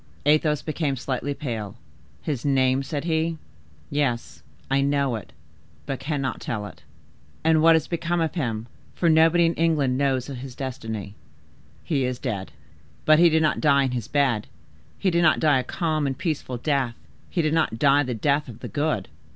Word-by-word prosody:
Athos 150 0 +3
became 155 -3 -1
slightly 135 +2 -3
pale. 115 -7 -5 0.5
"His 140 -6 -3
name?" 130 -1 +2
said 140 +1 -4
he, 165 0 0 0.5
"yes, 120 - -1 0.3
I 135 0 +2
know 140 -2 +1
it, 110 - -8 0.5
but 135 -2 -3
cannot 135 -1 -2
tell 105 -3 -3
it." - - -11 0.6
"And 160 0 +4
what 165 +1 +7
is 160 - +1
become 170 0 -1
of 160 -1 0
him, 115 -9 -2 0.3
for 170 - +2
nobody 165 +2 +5
in 165 - +2
England 150 -6 +1
knows 135 -3 +1
his 130 -2 -7
destiny?" 110 -6 -5 0.7
"He 140 -5 0
is 125 -1 -1
dead." 100 -5 -4 0.5
"But 155 0 +6
he 170 0 +7
did 160 0 +2
not 155 - +1
die 140 -3 +4
in 130 - 0
his 120 -3 -3
bed; 135 -7 +1 0.5
he 190 - +1
did 170 0 +2
not 165 -2 +4
die 150 -4 +4
a - - -2
calm 155 -2 -1
and 135 -1 -3
peaceful 145 -6 -3
death; 130 -2 0 0.3
he 170 - 0
did 155 0 +1
not 160 -8 +1
die 140 +2 +4
the 130 -4 -2
death 140 +6 +1
of 115 - -11
the - - -5
good?" 145 -10 -1
140 Hz, 180 wpm, -24 LUFS, 125-155 Hz, 0.7 s, what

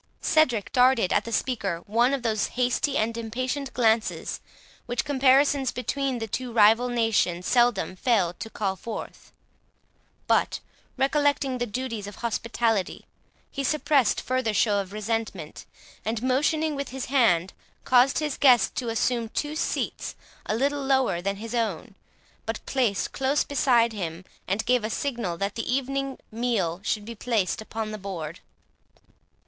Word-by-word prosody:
Cedric 255 -10 +2
darted 250 -6 +4
at - - +2
the 230 - -6
speaker 205 -8 -1
one 235 +5 +2
of 275 -3 -2
those 220 -2 +1
hasty 255 +3 +1
and 225 +1 0
impatient 255 +4 -3
glances, 225 -2 +1 0.5
which 245 0 -1
comparisons 275 -1 +3
between 270 +1 -2
the 225 - -3
two 245 +3 -4
rival 225 +2 +5
nations 220 -7 +1
seldom 240 -6 +2
failed 185 -5 +1
to 225 - -6
call 195 -3 -2
forth; 220 +4 -8 0.9
but, - - +2 0.4
recollecting 275 -1 +1
the 245 - -1
duties 230 -2 -4
of 205 - -8
hospitality, 230 -3 -1 0.5
he 275 - -3
suppressed 285 -3 +2
further 255 -4 -1
show 205 0 +3
of 195 -1 -5
resentment, 215 -6 -4 0.4
and, 220 +1 -2
motioning 300 +4 +1
with 280 -1 -4
his 265 0 -5
hand, 190 -10 +2 0.3
caused 255 +1 +4
his 300 -3 -2
guests 255 -4 +5
to 245 -2 -3
assume 230 0 0
two 295 +6 -3
seats - - -2 0.3
a 215 - 0
little 280 +4 0
lower 265 -9 +2
than 200 +2 -1
his 225 +3 -7
own, 215 -5 -2 0.5
but 225 0 -4
placed 240 -7 0
close 270 +2 +1
beside 240 -5 +2
him, 175 -3 -5 0.2
and 200 +4 -1
gave 250 -2 +2
a 215 - -2
signal 235 -9 -2
that 200 +3 -2
the 230 - -3
evening 275 +1 -1
meal 215 -7 -1
should 210 0 -1
be 235 - -6
placed 220 -4 -1
upon 220 0 -5
the 215 - -6
board. 175 -4 -6
235 Hz, 150 wpm, -26 LUFS, 210-260 Hz, 0.9 s, rival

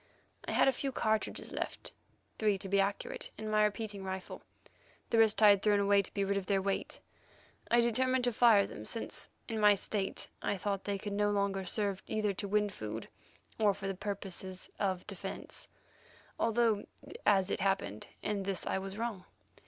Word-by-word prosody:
I - - -3
had - - +5
a - - +6
few 270 +1 -2
cartridges 220 -3 -1
left—three, 210 -2 -4
to 195 - -6
be 200 +1 +2
accurate—in 200 +2 -2
my 215 0 +4
repeating 210 -1 -2
rifle; 190 0 -5 0.7
the 230 - +4
rest 220 -1 +5
I 210 - +10
had 200 -1 +5
thrown 205 -1 +3
away 200 0 +4
to - - -11
be 200 - -1
rid 200 0 0
of 195 - -3
their 200 -1 +3
weight. 195 0 -2 0.7
I 235 0 +5
determined 255 +2 +2
to 245 -1 +2
fire 220 -3 +6
them, 105 - -8
since, 230 - -2 0.2
in 225 -1 -2
my 210 -1 +7
state 195 0 -2
I 205 - -1
thought 200 0 -2
they 200 -1 -1
could 205 +1 -5
no 205 0 +2
longer 200 -2 0
serve 200 0 0
either 215 -2 0
to 200 - -4
win 210 0 +2
food 110 - -6 0.5
or 205 -3 +4
for 200 - -8
the 195 - -1
purposes 190 -1 -5
of 190 -3 0
defence, 195 -1 -6 0.7
although, 225 -2 +2 0.4
as 195 -2 +4
it - - 0
happened, 190 - -1 0.2
in 210 -1 -1
this 195 -1 -3
I - - 0
was 195 +1 -6
wrong. 220 -5 -3
200 Hz, 180 wpm, -33 LUFS, 195-215 Hz, 0.7 s, I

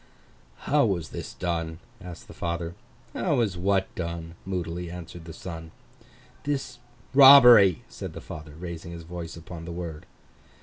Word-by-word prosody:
'How 145 0 +3
was 90 -7 0
this - - -7
done?' 85 -2 -2 0.3
asked 90 -2 -10
the - - -11
father. 85 0 -3 0.4
'How - - 0
was 110 -6 +1
what 95 +2 0
done?' 85 -1 -5
moodily 90 -2 -3
answered 85 -1 -9
the 80 - -8
son. 80 -1 -8 0.7
'This 135 -4 -3 0.3
robbery,' 125 - +9
said - - -8
the - - -7
father, 80 -1 -9
raising 85 0 -7
his 85 -1 -8
voice 85 -1 -7
upon 85 0 -9
the 85 - -6
word. 85 -3 -6
85 Hz, 145 wpm, -26 LUFS, 85-95 Hz, 0.7 s, robbery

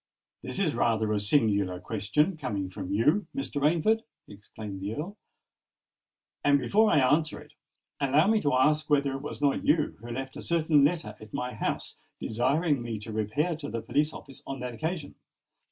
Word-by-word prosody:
"This - - -3
is 180 -6 +1
rather 110 -2 +1
a 105 - +1
singular 100 -5 +2
question—coming 110 - -1
from 95 -1 -6
you, 150 - +2
Mr. 215 - -3
Rainford!" 170 +9 +3 0.3
exclaimed 100 -1 -9
the 100 +3 -3
Earl; 175 +7 -5 1.3
"and 145 0 +5
before 205 - +3
I - - +4
answer 145 +4 +2
it, 150 0 -15 0.5
allow 145 +4 +3
me 215 +1 +3
to 145 - +1
ask 150 +4 +3
whether 140 -2 +3
it 135 0 -4
was 145 0 -6
not 140 -1 +2
you 150 0 +2
who 120 - -9
left 130 +2 -5
a - - -6
certain 160 -3 +3
letter 145 -8 0
at 110 -1 -10
my 125 0 -3
house, - - -3 0.2
desiring 140 +5 +1
me 115 -2 -4
to 105 +1 -7
repair 125 - 0
to 145 -3 -6
the 115 -1 -4
police 150 +1 +1
office 135 -4 -11
on 135 -1 -5
that 125 -1 -4
occasion?" 160 +4 -4
140 Hz, 175 wpm, -28 LUFS, 110-155 Hz, 1.3 s, and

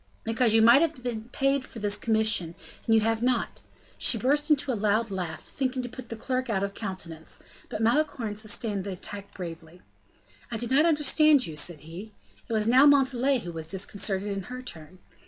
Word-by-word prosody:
"Because 225 0 +2
you 225 - +5
might 235 +5 +7
have 320 -6 -1
been 235 -2 -4
paid 275 +1 +1
for 245 - -12
this 205 -1 +1
commission, 220 -7 +1 0.3
and 225 - +4
you 220 - +4
have 225 +1 0
not." 245 -1 0
And - - -23 0.4
she 235 - +4
burst 290 +7 +1
into 285 -2 +2
a - - 0
loud 215 +1 0
laugh, 180 -4 -4
thinking 255 -1 -3
to 245 - -5
put 245 0 -10
the 230 - -4
clerk 255 +2 -3
out 195 -3 0
of 200 0 -3
countenance; 185 -6 -7 0.3
but 220 - -3
Malicorne 235 -3 0
sustained 210 -1 -2
the 200 0 -4
attack 200 +2 -8
bravely. 170 -1 -9 0.7
"I 235 - -3
do 240 - -3
not 275 +7 +3
understand 300 -2 +4
you," 160 - -7
said 150 +1 -3
he. 180 +7 -10 0.4
It - - -2
was 215 -1 +2
now 255 +5 +6
Montalais 270 -2 +3
who 175 - -7
was 160 -1 -6
disconcerted 195 +2 -2
in 195 -2 -4
her 255 0 -7
turn. 170 -6 -7
225 Hz, 200 wpm, -27 LUFS, 195-255 Hz, 0.7 s, might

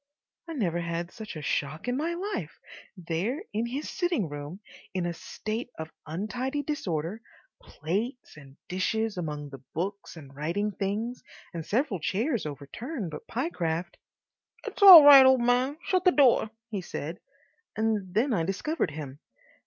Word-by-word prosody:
I 330 - -5
never 180 - -1
had 170 +1 -3
such 215 -5 -8
a 155 - -7
shock 150 - -2
in 245 - 0
my 325 +5 -1
life. 400 +4 -4 0.4
There 185 - -2
was 230 +2 -1
his 285 +4 -3
sitting 345 - -1
room 145 +5 -7 0.4
in 180 -2 0
a 175 - -2
state 220 +7 -5
of 160 0 -6 0.2
untidy 245 - -3
disorder, 195 - -3 0.4
plates 225 - -4
and 140 -2 -15
dishes 220 +4 -1
among 150 -4 -4
the 135 -2 -10
books 195 +4 -4
and 140 -3 -12
writing 170 +9 -1
things, 210 +6 -3 0.3
and 165 -1 -4
several 220 - 0
chairs 220 - -1
overturned, 165 - -6
but - - -9
Pyecraft— 175 - -2 0.7
"It's - - -7
all 370 -6 +12
right, 280 -2 +11
o' 260 0 +6
man; 250 +4 +1
shut 370 -1 +1
the 365 - +6
door," 265 -8 +4 0.2
he 200 -3 -2
said, 165 -1 -6 0.6
and 215 -4 0
then 245 +4 +2
I 185 - +1
discovered 200 - -1
him. 145 -2 -8
205 Hz, 155 wpm, -28 LUFS, 165-255 Hz, 0.7 s, all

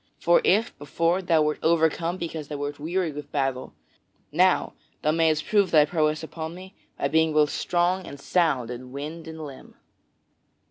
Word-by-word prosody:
For - - +4
if, 240 - +2
before, 165 +5 0
thou 165 -4 +3
wert 150 0 -1
overcome 165 +1 +1
because 160 -4 -5
thou 150 - -5
wert 145 0 -4
weary 170 +2 -1
with 145 0 -9
battle, 135 -2 -2 0.6
now - - +2 0.3
thou 155 - +3
mayst 160 -1 +2
prove 205 -3 +2
thy 155 -3 +6
prowess 155 0 0
upon 160 +1 -6
me 185 +2 -11 0.4
being 160 0 +3
both 150 -1 +3
strong 180 +1 0
and 140 - -9
sound 140 -7 +1
in 125 +1 -8
wind 155 +4 -7
and 160 -1 -7
limb." 135 -2 -12
160 Hz, 160 wpm, -25 LUFS, 145-170 Hz, 0.6 s, thy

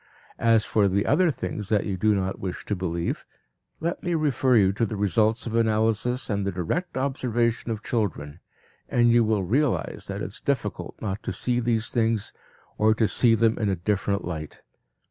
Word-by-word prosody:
As 115 -2 +4
for 105 -2 +2
the 100 +1 +1
other 170 +5 +3
things 105 -7 -4
that 105 -2 +2
you 100 - -2
do 105 +3 +2
not 95 0 -2
wish 95 -2 -5
to 105 - -1
believe, 85 -2 -2 0.6
let 170 +2 -2
me 175 -1 -1
refer 135 -5 +2
you 95 -2 +4
to 110 - -1
the 110 -1 -1
results 110 +3 +1
of 115 - -4
analysis 115 +2 +1
and 100 -2 -1
the 100 - -1
direct 95 - -3
observation 120 -4 0
of 110 -2 -3
children, 85 -9 -2 0.5
and 120 -1 +4
you 120 0 +5
will 110 -3 +1
realize 130 +8 0
that - - -4
it - - -4
is - - -8
difficult - - -2
not 100 0 -3
to - - -4
see 120 -1 0
these 115 -1 0
things 115 -3 0 0.5
or 110 +1 +4
to 110 -1 +2
see 115 +1 +4
them 115 0 +2
in 105 -3 0
a 95 - +1
different 100 +2 -1
light. 80 -3 -6
110 Hz, 190 wpm, -25 LUFS, 100-120 Hz, 0.6 s, you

